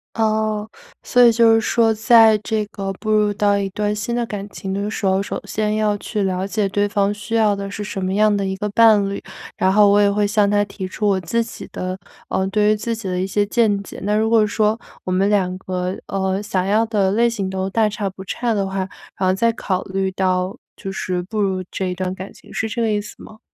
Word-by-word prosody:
哦， 215 Hz, -1 st, 0 dB, 0.4 s
所 245 Hz, -, +3 dB
以 235 Hz, -, +7 dB
就 230 Hz, 0 st, +5 dB
是 225 Hz, -, +3 dB
说 225 Hz, +1 st, +2 dB
在 225 Hz, 0 st, +6 dB
这 215 Hz, 0 st, -2 dB
个 195 Hz, -1 st, -5 dB
步 215 Hz, +3 st, -4 dB
入 210 Hz, -1 st, +3 dB
到 205 Hz, 0 st, +2 dB
一 195 Hz, -1 st, -2 dB
段 210 Hz, +2 st, -1 dB
新 220 Hz, +3 st, -3 dB
的 240 Hz, -1 st, 0 dB
感 205 Hz, -3 st, -6 dB
情 190 Hz, -1 st, -6 dB
的 200 Hz, +1 st, -2 dB
时 210 Hz, -, -4 dB
候， 190 Hz, 0 st, +2 dB
首 200 Hz, -, -4 dB
先 215 Hz, 0 st, -1 dB
要 215 Hz, -1 st, +1 dB
去 210 Hz, 0 st, -3 dB
了 190 Hz, 0 st, -1 dB
解 205 Hz, 0 st, 0 dB
对 205 Hz, +1 st, 0 dB
方 200 Hz, -1 st, +1 dB
需 210 Hz, +2 st, -5 dB
要 215 Hz, -2 st, +3 dB
的 200 Hz, 0 st, -5 dB
是 205 Hz, +1 st, -5 dB
什 195 Hz, -2 st, -4 dB
么 185 Hz, -, -1 dB
样 210 Hz, 0 st, +4 dB
的 200 Hz, -, -1 dB
一 190 Hz, 0 st, -2 dB
个 210 Hz, -, -2 dB
伴 215 Hz, -2 st, +5 dB
侣。 200 Hz, 0 st, -4 dB, 0.3 s
然 190 Hz, -, +2 dB
后 205 Hz, +1 st, +6 dB
我 205 Hz, +1 st, +5 dB
也 200 Hz, -1 st, +4 dB
会 205 Hz, +1 st, +1 dB
向 205 Hz, 0 st, +2 dB
他 205 Hz, 0 st, +3 dB
提 195 Hz, -1 st, -6 dB
出 210 Hz, +3 st, -2 dB
我 195 Hz, -2 st, +2 dB
自 230 Hz, +7 st, -1 dB
己 225 Hz, -, -9 dB
的 185 Hz, 0 st, -4 dB, 0.3 s
呃， 190 Hz, -, 0 dB
对 210 Hz, +2 st, +2 dB
于 -, -, +3 dB
自 225 Hz, +2 st, -3 dB
己 220 Hz, -3 st, -7 dB
的 180 Hz, -1 st, -1 dB
一 190 Hz, -, -1 dB
些 205 Hz, +2 st, +1 dB
见 210 Hz, -2 st, +1 dB
解。 -, -, -10 dB
那 205 Hz, +1 st, +1 dB
如 220 Hz, +1 st, +2 dB
果 225 Hz, -2 st, +5 dB
说 215 Hz, +1 st, +1 dB, 0.2 s
我 185 Hz, -, -4 dB
们 190 Hz, +2 st, +2 dB
两 190 Hz, -3 st, +1 dB
个， 185 Hz, 0 st, -3 dB
呃， 190 Hz, 0 st, -1 dB
想 190 Hz, -3 st, -1 dB
要 210 Hz, +3 st, +3 dB
的 200 Hz, -4 st, +1 dB
类 235 Hz, +4 st, +3 dB
型 210 Hz, -5 st, -3 dB
都 190 Hz, 0 st, -2 dB
大 220 Hz, +2 st, +2 dB
差 210 Hz, -1 st, -3 dB
不 190 Hz, 0 st, -10 dB
差 235 Hz, +5 st, -2 dB
的 200 Hz, -2 st, 0 dB
话， 190 Hz, 0 st, -5 dB, 0.4 s
然 185 Hz, -1 st, 0 dB
后 -, -, +3 dB
再 230 Hz, +5 st, +2 dB
考 190 Hz, -4 st, -2 dB
虑 190 Hz, 0 st, -2 dB
到 185 Hz, 0 st, 0 dB, 0.2 s
就 195 Hz, -, -6 dB
是 180 Hz, -2 st, -2 dB
步 210 Hz, +4 st, -5 dB
入 190 Hz, -2 st, 0 dB
这 190 Hz, -, -3 dB
一 180 Hz, -, -2 dB
段 185 Hz, 0 st, -3 dB
感 190 Hz, +1 st, -8 dB
情， -, -, -17 dB
是 220 Hz, -, -2 dB
这 225 Hz, +2 st, -3 dB
个 225 Hz, -, +1 dB
意 210 Hz, -1 st, +1 dB
思 205 Hz, +1 st, -8 dB
吗？ 220 Hz, -, -13 dB
205 Hz, 270 characters per minute, -20 LUFS, 190-215 Hz, 0.4 s, 以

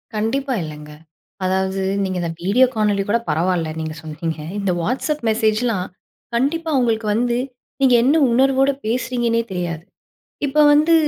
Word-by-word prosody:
கண்டிப்பா, 260 Hz, +6 st, -1 dB
இல்லங்க. 150 Hz, -1 st, -9 dB, 0.5 s
அதாவது, 190 Hz, +1 st, 0 dB, 0.2 s
நீங்க 185 Hz, -1 st, -2 dB
இந்த 170 Hz, -1 st, -2 dB
வீடியோ 205 Hz, +9 st, +4 dB
காணொலி 210 Hz, -2 st, +1 dB
கூட 230 Hz, +3 st, +3 dB
பரவால்ல, 170 Hz, 0 st, 0 dB
நீங்க 155 Hz, -1 st, -4 dB
சொன்னீங்க. 160 Hz, +1 st, -5 dB, 0.2 s
இந்த 200 Hz, -2 st, 0 dB
WhatsApp 270 Hz, -, -1 dB
மெசேஜ்லாம், 220 Hz, -2 st, +1 dB, 0.5 s
கண்டிப்பா 320 Hz, +7 st, 0 dB
உங்களுக்கு 225 Hz, -3 st, 0 dB
வந்து, 240 Hz, +1 st, +1 dB, 0.4 s
நீங்க 265 Hz, -2 st, +5 dB
என்ன 275 Hz, +5 st, +3 dB, 0.2 s
உணர்வோடு 270 Hz, +2 st, +3 dB
பேசுறீங்கன்னே 240 Hz, 0 st, 0 dB
தெரியாது. 170 Hz, -3 st, -3 dB, 0.6 s
இப்ப 300 Hz, +2 st, +3 dB
வந்து 305 Hz, +3 st, +4 dB
220 Hz, 130 wpm, -20 LUFS, 180-255 Hz, 0.6 s, நீங்க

